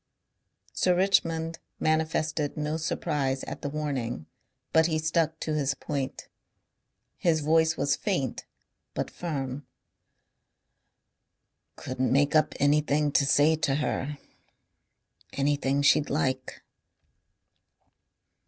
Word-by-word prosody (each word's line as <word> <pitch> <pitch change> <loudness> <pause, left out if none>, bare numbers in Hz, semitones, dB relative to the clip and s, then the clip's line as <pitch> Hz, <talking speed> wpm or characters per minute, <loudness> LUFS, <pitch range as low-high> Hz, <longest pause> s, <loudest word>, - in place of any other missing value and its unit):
Sir 180 -1 +2
Richmond 165 -3 +1 0.2
manifested 155 -1 0
no 150 +1 -1
surprise 140 -4 -1
at - - -7
the 145 - -3
warning. 135 - -3 0.5
But 160 0 +5
he 160 -2 0
stuck 160 0 0
to 155 - -2
his 140 -2 0
point. 140 -3 -4 0.9
His 160 -3 +2
voice 160 +1 +3
was 140 0 +2
faint 175 - -2 0.5
but - - -3
firm. 145 -4 -4 2.1
"Couldn't 130 0 -2
make 145 +3 +3
up 155 0 +3
anything 145 0 +2
to 140 -1 +3
say 145 +3 +4
to 145 -3 +1
her. 145 0 -2 1.2
Anything 140 0 +1
she'd 145 +1 +4
like." 130 -3 -2
150 Hz, 100 wpm, -27 LUFS, 140-160 Hz, 2.1 s, But